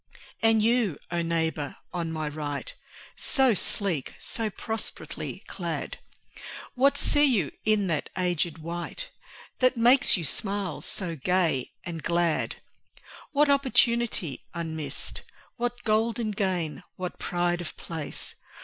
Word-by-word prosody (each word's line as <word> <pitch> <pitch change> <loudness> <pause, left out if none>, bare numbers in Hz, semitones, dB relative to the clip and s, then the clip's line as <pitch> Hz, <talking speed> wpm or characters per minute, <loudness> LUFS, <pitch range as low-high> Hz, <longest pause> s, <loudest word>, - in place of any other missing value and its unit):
And 225 -1 +5
you, 225 - +3
O 170 0 +1
neighbour 160 -3 -1 0.2
on 170 -2 -2
my 155 -1 -2
right 145 -1 -4 0.4
So 265 -3 +4
sleek, 185 -6 +1
so 225 -2 -2
prosperously 220 +2 -4
clad! - - -4 0.7
What 275 +3 +4
see 290 +1 +4
you 215 - +2
in 215 -2 +3
that 160 -5 -1
aged 175 -3 0
wight 175 - -5 0.5
That 255 -1 +4
makes 245 +1 +6
your 170 - -3
smile 200 +2 -1
so 175 -4 -2
gay 165 -3 +1
and 165 -2 -5
glad? 170 -1 +1 0.8
What 295 0 +4
opportunity 235 - +2
unmissed? 160 -3 -3 0.4
What 245 0 -2
golden 220 0 +1
gain, 185 -6 -1
what 180 -1 -5
pride 175 0 0
of 175 - -6
place? 160 -3 -4
185 Hz, 120 wpm, -28 LUFS, 165-230 Hz, 0.8 s, makes